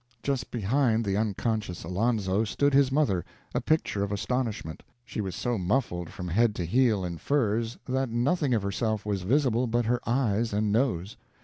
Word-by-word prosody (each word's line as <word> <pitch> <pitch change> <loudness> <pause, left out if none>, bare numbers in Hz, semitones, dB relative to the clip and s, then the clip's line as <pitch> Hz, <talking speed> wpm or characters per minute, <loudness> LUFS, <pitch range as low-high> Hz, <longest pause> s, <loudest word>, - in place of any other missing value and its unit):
Just 135 -2 -1
behind 115 +1 +1
the 100 -1 0
unconscious 105 -2 -1
Alonzo 100 +2 +1
stood 140 +7 +1
his 135 -1 +4
mother, 115 - +2 0.3
a - - 0
picture 155 -10 0
of 100 0 -1
astonishment. 110 -5 -2 0.2
She 110 - -4
was 95 -4 -4
so 120 -3 -1
muffled 90 -4 -1
from 90 - -6
head 110 +4 +2
to 90 - -2
heel 110 -1 +2
in 85 -2 -5
furs 115 -4 0
that 130 0 0
nothing 130 +3 +1
of 105 - 0
herself 105 +2 -1
was 100 -2 -1
visible 125 +3 +2
but 120 +1 +1
her 120 +2 +1
eyes 115 -3 +1
and 105 0 +1
nose. 110 -5 0
110 Hz, 175 wpm, -28 LUFS, 100-125 Hz, 0.3 s, his